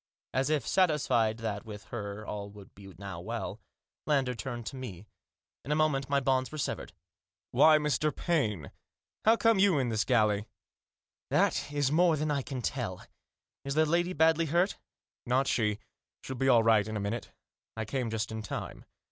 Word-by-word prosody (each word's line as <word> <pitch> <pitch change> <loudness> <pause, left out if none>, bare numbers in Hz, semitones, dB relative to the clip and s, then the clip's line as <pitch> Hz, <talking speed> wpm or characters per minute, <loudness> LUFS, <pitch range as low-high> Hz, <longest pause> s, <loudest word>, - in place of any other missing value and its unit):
As 130 +2 +1
if 150 -6 0
satisfied 135 - +2
that 110 -3 -4
with 105 -2 -9
her 105 -2 -5
all 100 -1 -5
would 100 -1 -14 0.3
now 100 -3 -7
be - - -12
well, 115 -2 -4 0.5
Lander 135 -4 +2
turned 120 +1 -6
to 135 - -6
me. 110 -8 -7 0.6
In 140 - -5
a - - +3
moment 145 -3 +1
my 140 0 +3
bonds 130 -1 +1
were 155 - -6
severed. 145 - -3 0.3
" 95 -1 -66
Why, 155 +5 +6
Mr. 150 0 +1
Paine, 110 - -1 0.5
how 225 +1 +7
come 225 -3 +3
you 190 -5 +5
in 130 -3 +1
this 110 -2 +1
galley? 105 -2 +2 0.3
" - - -66
" - - -66
That - - +1
is 145 -2 +1
more 165 0 +4
than 150 +1 -1
I 140 -1 0
can 130 -2 -6
tell. 110 -9 -3 0.6
Is 140 +1 -3
the 155 0 +4
lady 175 +3 +1
badly 160 +1 +3
hurt?" 175 +6 +1 0.2
" - - -67
Not 130 +3 +2
she. 105 -5 +1 0.5
She'll 130 - -5
be 135 +2 +1
all 120 -3 +6
right 110 -2 +4
in 110 0 -3
a - - -2
minute. 105 +3 -3 0.5
I 110 - -2
came 120 +2 -2
just 110 0 -2
in 110 0 -4
time." 105 - -6
130 Hz, 190 wpm, -30 LUFS, 110-150 Hz, 0.6 s, how